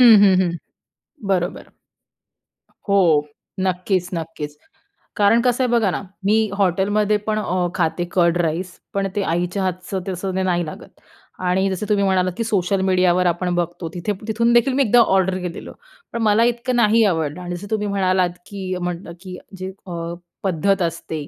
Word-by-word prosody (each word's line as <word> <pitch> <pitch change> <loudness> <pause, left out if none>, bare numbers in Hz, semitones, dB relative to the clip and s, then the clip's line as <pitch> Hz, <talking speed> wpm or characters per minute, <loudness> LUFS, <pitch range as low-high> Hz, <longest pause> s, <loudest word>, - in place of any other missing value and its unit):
हं, 235 -3 +9
हं, 190 -2 +6
हं, 170 -1 -1 0.7
बरोबर. 180 -2 -1 1.2
हो, 200 0 +4 0.6
नक्कीच, 185 0 0
नक्कीच. 160 -3 -5 0.6
कारण 210 +3 +4
कसं 250 +1 +1
आहे 250 - +1
बघा 225 -4 +3
ना, - - -3 0.2
मी 210 +2 +4 0.2
हॉटेलमध्येपण 205 +3 +1
अ, 180 -3 0
खाते 170 0 0
कर्ड 175 -1 +3
राईस, 175 +3 -3 0.2
पण 195 0 0
ते 205 - +1
आईच्या 180 +3 -1
हातचं 185 +1 -3
तसं 190 0 -3
ते 190 - 0
नाही 175 -2 +1
लागत 155 - -11 0.5
आणि 190 +2 +2
जसं 190 +3 -3
तुम्ही 205 -1 +2
म्हणालात, 185 -1 +2
की 230 - 0
सोशल 195 -3 0
मीडियावर 185 -1 +3
आपण 175 +1 0
बघतो 175 -1 -2
तिथे 180 +4 -2
तिथून 230 +2 +2
देखील 245 +3 +4
मी 275 - +3
एकदा 245 0 +4 0.2
ऑर्डर 190 -1 +2
केलेलं, 175 -2 -6 0.4
पण 235 - -2
मला 215 +2 +4
इतकं 245 +2 -3
नाही 230 -1 +4
आवडलं 160 -3 -1
आणि 175 0 -4
जसं 200 +4 -9
तुम्ही 210 -1 0
म्हणालात, 185 -2 +2 0.2
की 190 -2 -5
म्हणलं 175 0 -4
की 185 -1 -9
म्हण 195 - -14
जी 185 +1 -5 0.2
अ, 170 -1 -4 0.3
पद्धत 190 +1 +1
असते 160 -3 -3
185 Hz, 165 wpm, -21 LUFS, 175-205 Hz, 1.2 s, हं